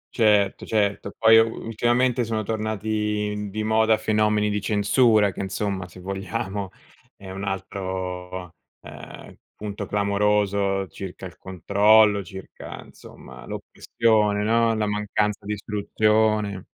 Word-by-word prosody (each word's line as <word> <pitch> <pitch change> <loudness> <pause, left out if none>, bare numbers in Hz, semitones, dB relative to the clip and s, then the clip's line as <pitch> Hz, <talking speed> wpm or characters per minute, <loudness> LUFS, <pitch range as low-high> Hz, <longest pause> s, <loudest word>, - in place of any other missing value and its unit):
Certo, 105 -4 +3
certo. 100 -2 0
Poi 115 0 +7
u 115 0 0
ultimamente, 120 +2 +1
sono 110 -1 -2
tornati 105 -1 -2
di 110 +2 -4
moda, 110 0 +3
fenomeni 105 -1 +1
di 105 - -1
censura, 105 0 +3
che, - - -6
insomma, 95 -1 -3
se 90 +1 -14
vogliamo 100 +1 -4 0.5
è 95 -1 -11
un 95 +1 -6
altro, 95 -2 -5 0.3
ehm, - - -11 0.2
punto 105 -1 -6
clamoroso 100 -1 +1
circa 95 +2 -8
il 90 - -9
controllo, 100 +2 +3
circa, 95 +2 -10
insomma, 60 -1 -14
l'oppressione, 105 -3 0
no, 115 +1 +2
la 110 -1 0
mancanza 105 0 -1
di 105 - -1
istruzione. 105 -1 0
105 Hz, 120 wpm, -24 LUFS, 100-110 Hz, 0.5 s, Poi